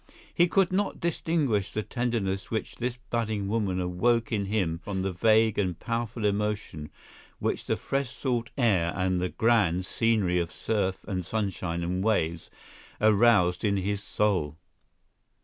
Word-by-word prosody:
He 175 - +4
could 190 +1 +2
not 200 +1 0
distinguish 150 - 0
the 110 - -2
tenderness 115 -7 -2
which 110 - -3
this 120 0 -2
budding 110 -4 -1
woman 100 -4 0
awoke 110 +7 +1
in 100 -3 0
him 95 -6 0
from 95 +1 -3
the 95 - -1
vague 110 +3 +3
and 90 -4 -1
powerful 115 -1 -3
emotion 105 -7 -2 0.5
which - - -2
the - - +1
fresh 135 -2 -2
salt 125 -2 -2
air 95 -10 +2
and 95 -1 0
the 90 - 0
grand 100 -7 +2
scenery 105 -5 +1
of 85 -1 -2
surf 100 -4 -2
and 95 -3 -2
sunshine 90 -4 -2
and 90 +2 -1
waves 85 -7 0 0.5
aroused 105 -4 +4
in 100 -2 +2
his 100 +1 -1
soul. 95 -7 0
105 Hz, 150 wpm, -27 LUFS, 90-115 Hz, 0.5 s, He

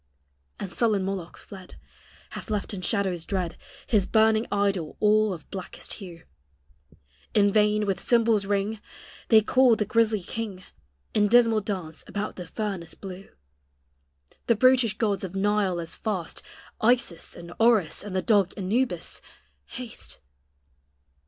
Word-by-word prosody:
And 185 -3 -6
sullen 215 -5 +1
Moloch 190 -3 -4
fled, 190 -3 -12 0.6
Hath - - -8
left 210 0 -2
in 190 - -5
shadows 185 -3 0
dread 180 -2 -2 0.3
His 205 -5 +2
burning 220 0 +3
idol 200 -6 0
all 215 0 +4
of 170 -5 -7
blackest 190 -2 -7
hue; 170 -4 -10 1.1
In 200 -1 +4
vain, 210 0 +3
with 195 -3 -1
cymbal's 225 -4 +2
ring, 205 +1 -1 0.5
They 220 -2 +7
call 250 +2 +4
the 210 - -1
grisly 220 -2 +2
king, 200 -2 -5 0.5
In 210 -1 +3
dismal 230 -1 +5
dance 185 -6 -5
about 205 0 -4
the 180 -2 -7
furnace 190 -4 -4
blue; 195 0 -9 1.2
The 235 - +4
brutish 250 -2 +4
gods 205 -4 0
of 190 0 -5
Nile 200 -2 +1
as 165 -1 -5
fast 190 -7 -4 0.4
Isis 225 -8 +1
and 170 0 -10
Orus, 225 -8 +3
and 200 -2 -6
the 185 - 0
dog 200 -5 +3
Anubis 195 -1 -1 0.5
haste. 245 -3 -8
205 Hz, 135 wpm, -26 LUFS, 185-220 Hz, 1.2 s, They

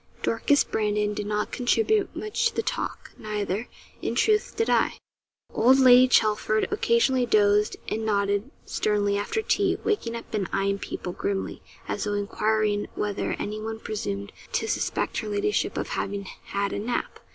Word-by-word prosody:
Dorcas 280 +5 +3
Brandon 210 -1 0
did 205 0 -4
not 210 0 -1
contribute 425 - +1
much 430 +2 0
to - - -16
the - - 0
talk; - - -4
neither, 210 0 -3 0.3
in - - -2
truth, 425 -1 +2
did 450 - 0
I. - - +2 0.6
Old 255 +3 +5
Lady 255 -1 +8
Chelford 215 -2 +2
occasionally 405 - +2
dozed 210 -1 +3
and 220 - -2
nodded 205 +1 0 0.2
sternly 205 -1 +1
after 205 - -1
tea, - - +2
waking 415 - -1
up 230 - -9
and 200 -4 -1
eyeing 200 0 0
people 180 - -5
grimly, 195 +1 -3 0.3
as - - -2
though 205 - -1
enquiring 210 0 0
whether 205 -1 -2
anyone 215 +1 -4
presumed 100 - -4 0.2
to - - 0
suspect - - -1
her 215 - -5
ladyship 210 - 0
of - - -3
having 200 0 -3
had 200 +1 -4
a - - -2
nap. 240 - -3
215 Hz, 155 wpm, -26 LUFS, 205-245 Hz, 0.6 s, Lady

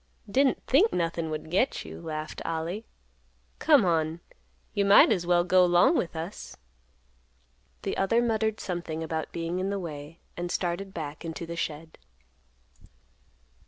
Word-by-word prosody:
"Didn't 265 +5 +2
think 370 - +4
nothin' 165 -1 -1
would 155 0 -5
get 225 +9 +1
you," - - -9
laughed 155 -1 -5
Ollie. 165 +7 -3 0.7
"Come 290 -9 +5
on, 160 -1 +1 0.5
you 200 - +1
might 200 0 +7
as 175 -2 0
well 175 -1 +4
go 185 +1 +5
'long 175 - +5
with 170 - -1
us." 165 +6 -7 1.3
The - - -2
other 195 +4 +2
muttered 220 -2 0
something 170 -3 -4
about 160 -1 -3
being 170 +2 -3
in 190 +1 -1
the 200 - -1
way, 155 -3 -7 0.2
and 175 0 -4
started 180 +2 -2
back 155 -3 -6
into 165 0 -5
the 170 0 -6
shed. 160 -1 -5
175 Hz, 145 wpm, -28 LUFS, 160-200 Hz, 1.3 s, might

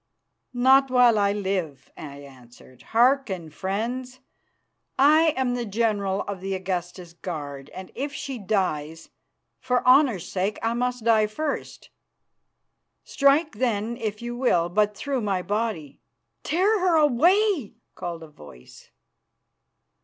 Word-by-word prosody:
"Not 265 +2 +5
while 245 -3 +4
I 200 0 +2
live," 190 -8 -3
I 140 -2 -9
answered. 130 -2 -16
"Hearken, 230 - +2
friends. 240 +9 -4 0.8
I 305 +4 +5
am 255 -2 0
the 245 -1 -2
general 205 -3 -1
of 200 -2 -6
the 195 0 -3
Augusta's 180 -2 -5
guard, 145 -6 -7
and 185 0 -10
if 280 +4 -4
she 275 -3 -6
dies, 165 -6 -2 0.5
for 250 -1 -1
honour's 255 - +4
sake 195 +3 -2
I 225 +1 +1
must 250 0 -2
die 220 -2 +3
first. 295 +7 -5 1.1
Strike, 290 +3 +2
then, 230 -2 -1
if 220 -2 -5
you 240 0 -4
will, 180 -9 +1
but 210 +2 +1
through 275 -3 -2
my 195 -4 -1
body." 205 -9 -3 0.4
"Tear 395 +6 +1
her 360 -2 +2
away!" 315 - +3 0.2
called 170 -2 -6
a - - -10
voice. 75 - -16
215 Hz, 125 wpm, -24 LUFS, 180-255 Hz, 1.1 s, Not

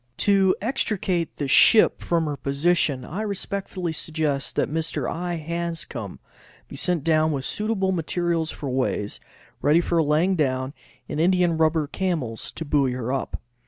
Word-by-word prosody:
To 195 -2 +3
extricate 195 - -1
the 145 - -2
ship 215 - +6
from 170 -2 +1
her 150 -1 -2
position 140 -1 +1
I 185 +11 -4
respectfully 195 -4 -3
suggest 150 -3 -2
that - - +1
Mr. 160 +2 -2
I. 175 +1 -3
Hanscom 165 - -4 0.5
be - - -10
sent 175 -5 0
down 155 -1 +3
with 135 -3 -3
suitable 210 -3 -1
material 170 -1 -1
for 150 - -6
ways, 125 -5 -1 0.4
ready 150 +4 +4
for 170 -1 +1
laying 160 +5 +2
down, 130 -3 0 0.3
and 150 - -4
india 180 +1 +4
rubber 160 -1 +2
camels 150 -9 -3
to 160 - -5
buoy 140 -3 +2
her 125 0 -3
up. 135 - -3
160 Hz, 150 wpm, -24 LUFS, 145-180 Hz, 0.5 s, ship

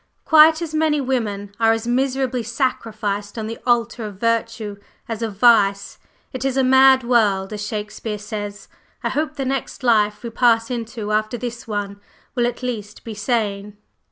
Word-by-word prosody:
Quite 315 +1 +6
as 320 -2 -6
many 310 -1 +2
women 215 -7 -2
are 225 0 +4
as 225 0 -3
miserably 260 0 0
sacrificed 220 -4 -2
on 220 - -3
the 225 +1 -6
altar 235 -1 +1
of 210 -2 -6
virtue 230 -2 -1 0.3
as 225 -1 -4
of 220 -4 -4
vice. 200 -4 +3 0.3
It 255 -1 -4
is 270 -1 0
'a 265 - +3
mad 265 0 +6
world,' 215 -5 +2
as 210 -1 -4
Shakespeare 210 0 -4
says. 205 -1 -6 0.4
I - - 0
hope 305 0 -2
the 270 - -3
next 270 0 -3
life 210 -3 +2
we 235 - -5
pass 230 0 +2
into 225 -3 -4
after 215 +2 0
this 240 -1 -6
one 205 -1 -4 0.3
will 240 -2 +1
at 245 +1 -5
least 210 -4 -5
be 225 - -6
sane." 205 -2 -2
230 Hz, 170 wpm, -21 LUFS, 210-255 Hz, 0.4 s, Quite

